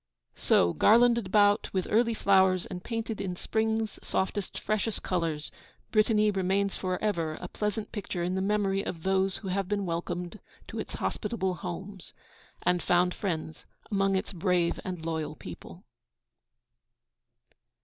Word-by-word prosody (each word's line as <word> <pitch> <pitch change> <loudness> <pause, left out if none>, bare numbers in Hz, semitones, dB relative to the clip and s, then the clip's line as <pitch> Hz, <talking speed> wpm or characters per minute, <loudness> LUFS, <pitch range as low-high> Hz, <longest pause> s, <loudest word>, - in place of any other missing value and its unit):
So, 85 -1 +3
garlanded 235 - +5
about 205 +1 +4
with 185 -2 0
early 230 +1 +3
flowers 190 -3 +4
and 180 0 -7
painted 225 -3 -3
in 185 -2 -3
spring's 220 +2 -1
softest, 190 0 -2
freshest 215 0 -1
colours, 165 -4 -1 0.4
Brittany 215 -1 +4
remains 195 +1 0
for 185 -1 -2
ever 165 -7 0
a 180 - -6
pleasant 210 +2 -3
picture 195 -4 -3
in 180 +1 -1
the 190 - 0
memory 195 -1 +1
of 165 -2 -5
those 190 0 +1
who 195 - -6
have 195 0 -1
been 200 0 -1
welcomed 175 +3 -3 0.3
to - - -5
its - - -5
hospitable 190 -5 -1
homes, 185 +1 -7 0.5
and 180 -1 +2
found 180 0 +3
friends 160 -5 -4 0.3
among 195 -1 +2
its 190 +1 -2
brave 180 -1 +1
and 180 -3 -5
loyal 160 -2 -2
people. - - -10
190 Hz, 140 wpm, -29 LUFS, 180-210 Hz, 0.5 s, garlanded